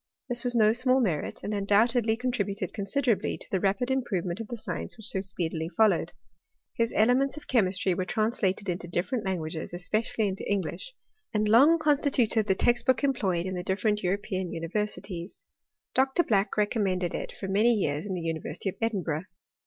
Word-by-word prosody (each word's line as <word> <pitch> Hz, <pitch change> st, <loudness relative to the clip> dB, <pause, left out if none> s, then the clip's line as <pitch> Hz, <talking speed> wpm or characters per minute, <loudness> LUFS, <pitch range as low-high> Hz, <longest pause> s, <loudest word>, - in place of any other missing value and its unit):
This 240 Hz, -1 st, +2 dB
was 245 Hz, -1 st, -1 dB
no 215 Hz, -1 st, +5 dB
small 255 Hz, +2 st, +3 dB
merit, 180 Hz, -, -1 dB
and 210 Hz, -, -3 dB
undoubtedly 220 Hz, +3 st, +2 dB
contributed 205 Hz, -6 st, -2 dB
considerably 225 Hz, +3 st, 0 dB
to -, -, -12 dB
the 190 Hz, -, +1 dB
rapid 200 Hz, +7 st, 0 dB
improvement 190 Hz, -9 st, -1 dB
m 225 Hz, -, -7 dB
the 240 Hz, -, -4 dB
science -, -, -5 dB
whicii 220 Hz, -, -13 dB
so 190 Hz, -3 st, 0 dB
speedily 165 Hz, -4 st, -2 dB
followed. 210 Hz, -2 st, +2 dB, 0.6 s
His 230 Hz, 0 st, 0 dB
elements 255 Hz, +6 st, +3 dB
of 300 Hz, -, -9 dB
chemistry 190 Hz, -5 st, +2 dB
were 185 Hz, -, -1 dB
translated 205 Hz, -1 st, -1 dB
into 175 Hz, -1 st, -3 dB
different 185 Hz, +7 st, -2 dB
languages, 165 Hz, -3 st, -3 dB
especially 215 Hz, +4 st, 0 dB
into 195 Hz, 0 st, -4 dB
English; 200 Hz, -, -3 dB, 0.4 s
and 210 Hz, 0 st, +2 dB
long 275 Hz, +10 st, +6 dB
constituted 275 Hz, -8 st, +2 dB
the 190 Hz, -, +3 dB
text 240 Hz, +4 st, +1 dB
book 260 Hz, +2 st, +3 dB
employed 195 Hz, -11 st, +1 dB
in 185 Hz, -, -3 dB
the 180 Hz, -, -3 dB
different 210 Hz, +3 st, 0 dB
European 190 Hz, -1 st, -2 dB
universities. 185 Hz, +1 st, -4 dB, 0.5 s
Dr. 270 Hz, +6 st, +3 dB
Black 205 Hz, -5 st, +1 dB
recommended 195 Hz, -4 st, 0 dB
it -, -, -4 dB
for 195 Hz, -, -6 dB
many 210 Hz, +5 st, +3 dB
years 175 Hz, -6 st, 0 dB
in 190 Hz, -, -2 dB
the 175 Hz, -, -4 dB
Uni 165 Hz, -1 st, -2 dB
versity 175 Hz, +5 st, -4 dB
of -, -, -8 dB
Edinburgh. 185 Hz, -8 st, -1 dB
205 Hz, 175 wpm, -28 LUFS, 185-235 Hz, 0.6 s, long